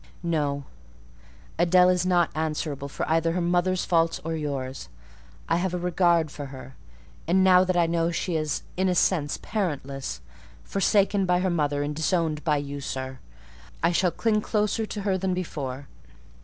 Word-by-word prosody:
"No: 145 -4 -1 1.0
Adèle 180 +1 +5
is 180 0 0
not 175 -2 +3
answerable 150 -3 -3
for - - -4
either 165 +1 +2
her 180 - 0
mother's 175 +1 +1
faults 165 -2 +2
or 165 0 -2
yours: 135 -4 -4 0.6
I 165 - +2
have 180 0 -1
a - - 0
regard 175 -3 +2
for 145 -2 -7
her; 135 -1 -10 0.5
and 185 +3 +4
now 185 -1 +6
that 185 -1 0
I 170 - +4
know 165 0 +1
she 170 +1 -2
is, 155 -1 -1
in 190 +1 +1
a 180 - +1
sense, 160 -5 +1
parentless—forsaken 185 - -1
by 180 0 +2
her 185 -1 +1
mother 145 -3 0
and 150 +1 -3
disowned 160 -1 0
by 150 -2 +2
you, 145 0 -4
sir—I 130 - -5
shall 180 +1 +2
cling 215 +4 +1
closer 215 +1 0
to 210 - -5
her 195 -2 0
than 185 0 0
before. 140 -6 -5
165 Hz, 160 wpm, -26 LUFS, 145-180 Hz, 1.0 s, now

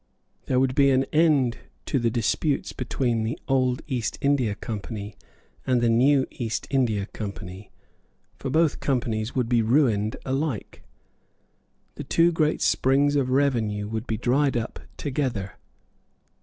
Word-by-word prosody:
There 125 - +2
would 130 -1 +2
be 140 +1 +4
an 130 0 +3
end 150 -7 +3 0.3
to 135 - 0
the 115 -1 +1
disputes 125 +5 -1
between 120 -2 -1
the 110 +1 -2
old 130 -2 +1
East 125 -6 -2
India 135 -7 +1
Company 105 -1 -6 0.5
and 125 -2 +2
the 120 -1 +2
new 130 +3 +4
East 115 -3 -3
India 115 -7 +1
Company; 100 -2 -8 0.7
for 135 - -5
both 160 +2 +2
Companies 115 -4 -1
would 125 -3 +1
be 120 -1 +3
ruined 110 -3 +2
alike. 135 -3 -3 1.2
The - - -5
two 170 +1 +3
great 155 -2 +1
springs 140 +2 +3
of 135 -3 +1
revenue 115 -7 +1
would 110 +2 -4
be 110 - -1
dried 130 +3 +1
up 115 0 -4 0.2
together. 130 -9 -2
125 Hz, 140 wpm, -25 LUFS, 110-140 Hz, 1.2 s, be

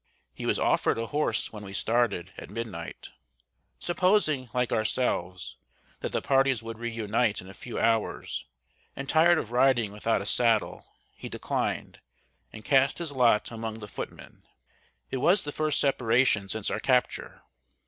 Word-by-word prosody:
He - - -5
was - - +2
offered - - +2
a 115 - -2
horse 145 -4 -1
when 105 -1 -8
we 95 -1 -8
started, 105 -5 0
at - - -9
midnight. 105 -8 -6 0.7
Supposing, 175 - +1
like 125 0 0
ourselves, 105 -5 -1 0.4
that - - -4
the - - -2
parties 135 -3 +2
would 115 0 -7
re 120 0 -3
unite 115 -1 0
in 95 - -10
a 95 - -10
few 120 - -7
hours, 115 -1 0 0.5
and 135 - -6
tired 165 +3 +5
of 115 - -3
riding 120 -4 +3
without 105 +2 0
a - - -9
saddle, 115 -1 +2 0.3
he - - -8
declined, - - -3 0.5
and 110 -1 -11
cast 135 0 +3
his 170 -3 -3
lot 120 -5 +3
among 110 -1 -5
the 105 -2 -8
footmen. - - -8 0.7
It 130 - -1
was 180 +9 +3
the 145 - -4
first 155 0 0
separation 120 -6 +2
since 110 -1 -2
our - - -1
capture. 125 +1 0
115 Hz, 160 wpm, -28 LUFS, 110-135 Hz, 0.7 s, tired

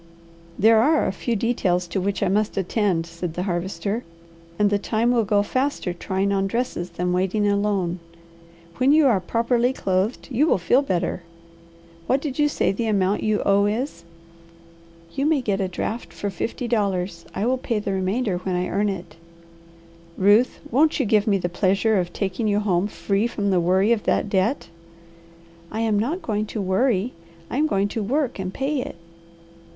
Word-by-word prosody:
"There 220 +2 +5
are 305 +6 +3
a - - 0
few 230 +5 -2
details 195 -6 0
to 190 - -1
which 200 +1 -1
I - - +2
must 210 +3 0
attend," 190 -3 0
said 170 0 -6
the 180 - -2
Harvester, 190 +4 -2 0.5
"and 205 -1 +3
the 205 - +2
time 225 +3 +1
will 235 -2 +3
go 205 0 +2
faster 255 -5 -1
trying 190 +3 -1
on 195 -1 +1
dresses 210 -5 -2
than 180 +1 -2
waiting 190 +3 +1
alone. 200 -3 0 0.8
When 260 +3 +4
you 310 -1 +5
are 230 -8 +4
properly 235 +6 +1
clothed 195 +2 -1
you 275 +6 +2
will - - +3
feel 240 +9 +3
better. 185 -7 -1 0.9
What 265 - +2
did 285 -1 -5
you 295 0 +4
say - - +1
the 225 +4 -2
amount 200 -1 +1
you 215 -1 0
owe 200 +1 +4
is?" 240 +8 -3 1.1
"You 275 +2 0
may 310 -2 +3
get 205 -6 -1
a 190 - 0
draft 215 +5 -4
for 205 - -4
fifty 230 +6 -4
dollars. 190 -6 -1
I 205 - -1
will 255 +1 +1
pay 235 -3 -2
the 205 -1 -2
remainder 190 +1 -1
when 185 0 -2
I 180 0 -1
earn 205 +2 +1
it." 185 -4 -6 1.0
"Ruth, 205 +6 +3
won't 305 +5 +3
you 270 - +2
give 210 0 +2
me 200 -2 +3
the 175 - -2
pleasure 195 +4 +1
of 175 -1 -2
taking 200 +4 -2
you 205 0 +2
home 195 -2 +1
free 200 +1 -1
from 205 -4 -1
the 185 - +3
worry 190 +5 +2
of 230 -3 +1
that - - +1
debt?" 200 +7 0 1.0
"I 220 - -2
am 220 -2 +2
not 305 - -2
going 215 -1 -1
to 220 - -5
'worry.' 200 +3 +1 0.4
I - - -2
am 305 +2 +3
going 200 -8 +1
to 220 - -3
work 260 +2 -1
and 185 -1 -3
pay 270 +4 -1
it." - - -6
205 Hz, 185 wpm, -23 LUFS, 190-235 Hz, 1.1 s, There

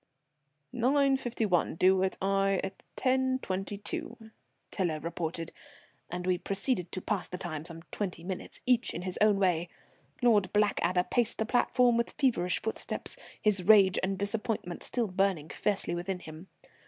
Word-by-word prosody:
"Nine 270 +3 +3
fifty 240 -3 -2
one; 180 -6 +1
due 185 +2 +4
at 190 0 0
Aix 195 0 +2
at 190 0 -8 0.2
10.22," 225 -4 -2 0.4
Tiler 170 -6 -1
reported, 165 +1 -4 0.6
and 180 +1 -4
we 180 -1 +1
proceeded 195 -2 0
to 185 - -4
pass 205 -4 -1
the 180 - -6
time, 160 -5 -4
some 165 -1 -4
twenty 180 -5 -3
minutes, 185 0 -6
each 245 -1 +2
in 175 - -4
his 185 -1 -4
own 210 -1 +5
way. 175 -3 +1 0.5
Lord 210 -6 +4
Blackadder 185 -4 +2
paced 235 +3 +1
the 220 - 0
platform 245 0 +3
with 235 - -1
feverish 205 -10 +1
footsteps, 220 - -3 0.2
his 210 -3 +2
rage 195 -1 +6
and 195 +1 -1
disappointment 205 -2 -2
still 240 -2 -1
burning 185 -5 0
fiercely 205 -4 0
within 175 +2 -3
him. 160 +1 -11
195 Hz, 150 wpm, -30 LUFS, 180-220 Hz, 0.6 s, rage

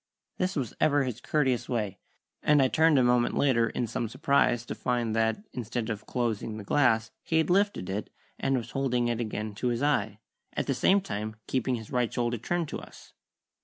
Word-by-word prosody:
This 185 +1 0
was 130 -8 -2
ever 145 -2 +4
his 125 -2 -4
courteous 130 -5 0
way, 105 -6 -2 0.4
and 150 -1 +4
I 130 -1 +4
turned 160 0 +4
a 130 - +5
moment 120 0 +2
later 115 -5 +3
in 120 - -2
some 115 0 -3
surprise, 140 -4 +2
to - - -4
find 120 -3 -1
that, 115 - +1
instead 120 -1 -3
of 105 0 -6
closing 115 -3 -2
the 105 - -7
glass, 110 -2 +2
he 160 - 0
had 160 +1 +2
lifted 200 - +2
it, 100 +2 -3 0.3
and 135 -1 +1
was 120 0 -5
holding 125 -3 0
it 120 0 -1
again 105 -1 -3
to 115 +5 -2
his 120 +2 0
eye, 110 -8 +1 0.4
at - - -1
the - - 0
same 200 +1 +3
time 110 - -4
keeping 130 0 0
his 110 -2 -8
right 125 -2 +1
shoulder 120 -1 -1
turned 175 +7 -1
to - - -4
us. - - -14
120 Hz, 200 wpm, -28 LUFS, 110-140 Hz, 0.4 s, a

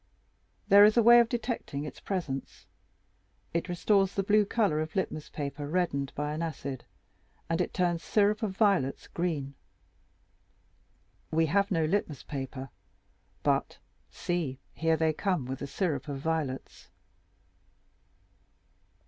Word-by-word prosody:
There 200 +1 +8
is 215 +2 +6
a 235 - +6
way 240 +1 +9
of 235 -1 +3
detecting 235 - -3
its 150 - -8
presence. 160 -9 -4 0.9
It 170 +2 -1
restores 195 +2 +2
the 195 - +1
blue 210 +1 +4
color 200 -8 +1
of 155 +3 -5
litmus 170 -5 -2
paper 145 0 -5
reddened 145 -5 0
by 150 +1 -2
an 155 - -3
acid, 140 -5 -4 0.6
and 165 +2 0
it - - -1
turns 175 -2 0
syrup 210 +1 +2
of 200 -4 -3
violets 195 - +2
green. 155 -6 -2 1.8
We 160 +1 +2
have 200 +6 +2
no 165 -6 +1
litmus 160 -4 -1
paper, 135 -1 -6 0.7
but, - - +1 0.3
see, 165 -7 -2 0.2
here 165 0 +1
they 160 0 +2
come 180 -5 -1
with 130 +1 -5
the 140 - -5
syrup 145 -3 -2
of 140 -2 -4
violets." 145 -3 -3
165 Hz, 130 wpm, -29 LUFS, 145-195 Hz, 1.8 s, way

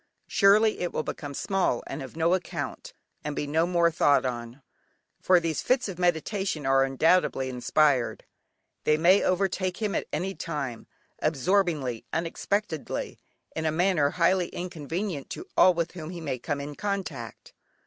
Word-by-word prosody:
Surely 210 +2 +4
it 175 - -2
will - - -2
become 145 -2 -6
small 190 -10 0
and - - -6
of 135 +2 -9
no 165 +2 +3
account, 190 - -4 0.3
and 150 -1 -4
be - - -2
no 160 +4 +1
more 170 -1 +3
thought 145 -4 +3
on! 120 +1 -5 0.6
For 185 -1 +5
these 165 -3 -2
fits 255 -2 +1
of 185 -3 -7
meditation 175 -1 0
are 135 0 +4
undoubtedly 135 0 +2
inspired! 130 0 +1 0.6
They 150 - +3
may 180 +5 +5
overtake 185 0 0
him 215 -2 -1
at - - -2
any 190 +1 -2
time, 145 -10 -5 0.3
absorbingly, 155 - +1
unexpectedly, 165 +1 -2 0.4
in 160 0 -1
a - - +2
manner 170 -3 +2
highly 180 +2 +2
inconvenient 170 -1 -4
to 360 - -8
all 185 -1 +6
with 170 0 -1
whom 160 -3 -8
he 175 -1 -6
may 140 -6 -3
come 145 +3 -3
in 145 +1 -6
contact. 165 - -5
165 Hz, 155 wpm, -27 LUFS, 145-185 Hz, 0.6 s, all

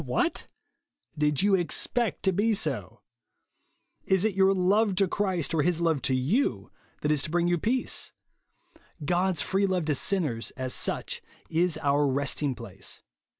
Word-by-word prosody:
What! - - -1 0.7
Did 150 +2 +1
you 200 0 +3
expect 200 +6 0
to 190 - +3
be 210 +4 +2
so? 210 - -2 1.1
Is 190 +1 +2
it 220 - +1
your 190 0 +4
love 195 +2 +2
to 195 +1 +2
Christ, 185 -4 -1
or 160 - +2
his 170 +2 +1
love 165 -5 +1
to 130 - +1
you, 130 - 0 0.3
that 150 - +1
is 150 -2 +2
to - - -4
bring 175 +1 +1
you 175 -1 +1
peace? 250 +8 0 0.9
God's 175 -1 +1
free 195 +5 +1
love 180 -4 0
to 150 - +1
sinners, 145 -8 0
as 130 -1 -2
such, - - -1 0.3
is 170 +1 +2
our 145 0 +3
resting 140 0 0
place. - - -9
175 Hz, 155 wpm, -27 LUFS, 145-195 Hz, 1.1 s, your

